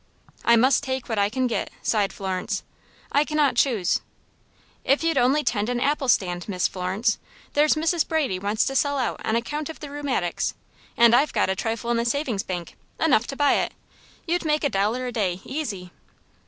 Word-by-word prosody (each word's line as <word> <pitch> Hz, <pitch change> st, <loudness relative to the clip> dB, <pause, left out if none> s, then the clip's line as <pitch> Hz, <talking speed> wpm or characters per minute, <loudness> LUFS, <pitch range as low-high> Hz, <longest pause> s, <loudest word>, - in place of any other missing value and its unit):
"I 235 Hz, -, +5 dB
must 255 Hz, +3 st, +4 dB
take 260 Hz, -2 st, -3 dB
what 225 Hz, -3 st, -1 dB
I 200 Hz, 0 st, +3 dB
can 255 Hz, +3 st, -1 dB
get," 240 Hz, -, -1 dB
sighed 205 Hz, -3 st, +1 dB
Florence. 190 Hz, -2 st, -3 dB, 0.5 s
"I 285 Hz, -, +4 dB
cannot 300 Hz, -2 st, +1 dB
choose." 225 Hz, -10 st, +2 dB, 0.8 s
"If 275 Hz, +4 st, +2 dB
you'd 330 Hz, 0 st, +1 dB
only 270 Hz, +5 st, +3 dB
tend 210 Hz, -3 st, 0 dB
an 245 Hz, -1 st, 0 dB
apple 280 Hz, +1 st, 0 dB
stand, 180 Hz, -5 st, +1 dB
Miss 180 Hz, -2 st, +1 dB
Florence! 190 Hz, +4 st, -1 dB, 0.3 s
There's 300 Hz, +2 st, +4 dB
Mrs. 325 Hz, +1 st, +1 dB
Brady 290 Hz, -, 0 dB
wants 205 Hz, +3 st, 0 dB
to 270 Hz, -, -2 dB
sell 285 Hz, +1 st, +2 dB
out 255 Hz, -, -2 dB
on 220 Hz, -, 0 dB
account 295 Hz, +6 st, -2 dB
of 320 Hz, -, -8 dB
the 295 Hz, -2 st, -8 dB
rheumatics, 275 Hz, -12 st, -2 dB, 0.4 s
and 235 Hz, 0 st, +6 dB
I've 280 Hz, +4 st, +3 dB
got -, -, +2 dB
a -, -, -1 dB
trifle 230 Hz, +3 st, -2 dB
in 235 Hz, -, +2 dB
the 235 Hz, -, 0 dB
savings 240 Hz, -5 st, 0 dB
bank 175 Hz, -3 st, -6 dB, 0.2 s
enough 260 Hz, -7 st, +3 dB
to 275 Hz, -, -5 dB
buy 290 Hz, 0 st, +3 dB
it. -, -, -2 dB, 0.5 s
You'd 350 Hz, 0 st, 0 dB
make 305 Hz, -1 st, +1 dB
a 285 Hz, -, +2 dB
dollar 215 Hz, +4 st, 0 dB
a 250 Hz, -, -3 dB
day, 190 Hz, -6 st, -1 dB
easy." 215 Hz, -, -4 dB
245 Hz, 195 wpm, -24 LUFS, 205-290 Hz, 0.8 s, and